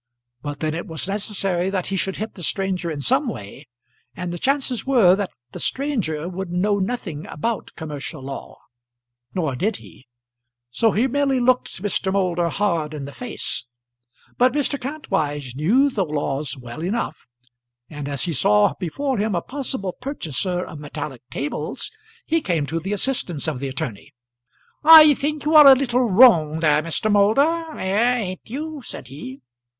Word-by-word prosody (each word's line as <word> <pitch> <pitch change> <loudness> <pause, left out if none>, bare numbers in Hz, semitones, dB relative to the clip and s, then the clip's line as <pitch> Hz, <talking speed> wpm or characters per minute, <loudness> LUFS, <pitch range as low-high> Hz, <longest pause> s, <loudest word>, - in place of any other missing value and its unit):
But 145 0 -6
then 155 -1 0
it 170 - -5
was 160 +2 -4
necessary 195 -3 -1
that 190 -2 -2
he - - +1
should 190 +1 -1
hit 215 +1 -5
the 180 - -11
stranger 185 0 -1
in 150 -3 -4
some 265 - +2
way, 135 - -7 0.5
and 175 -1 -4
the 175 - -5
chances 270 - 0
were 235 -10 +5
that 200 -1 -2 0.2
the - - -8
stranger 215 - -1
would 185 0 -5
know 200 +4 +1
nothing 185 -7 -4
about 230 +9 -3
commercial 150 -2 -6
law. 135 0 -7 0.8
Nor 155 -8 -1
did 205 - 0
he; 130 - -14 0.6
so 225 - +2
he 225 +5 +2
merely 275 0 +1
looked 250 -6 +1
Mr. 200 -1 0
Moulder 175 -3 +1
hard 165 -6 -1
in 140 -2 -5
the 140 - -8
face. 220 - -5 0.7
But 250 +1 +4
Mr. 280 -1 0
Kantwise 145 - -3
knew 240 - +3
the 205 -6 0
laws 145 -3 -2
well 120 +3 -8
enough, 210 - -3 0.6
and 145 -1 -7
as 140 -1 -2
he 170 - -1
saw 105 -2 +3
before 245 - -2
him 210 -1 0
a 170 - 0
possible 260 -9 -4
purchaser 180 - -2
of 155 - -9
metallic 145 -3 -6
tables, 145 +2 -3 0.3
he 325 +1 +1
came 170 - 0
to 165 +3 -2
the 190 +5 -5
assistance 195 - -1
of 150 -5 -2
the 140 - -3
attorney. 125 -6 -5 0.7
"I 310 -1 +10
think 295 +1 -3
you 305 - +1
are 300 -2 +10
a 270 - +10
little 250 -2 +1
wrong 175 -8 +6
there, 150 -2 +4
Mr. 165 +7 0
Moulder; 285 +11 +2
eh; 215 +6 +2
ain't 185 -5 -4
you?" 300 +4 -5
said 130 - -8
he. 135 0 -9
190 Hz, 165 wpm, -22 LUFS, 155-250 Hz, 0.8 s, I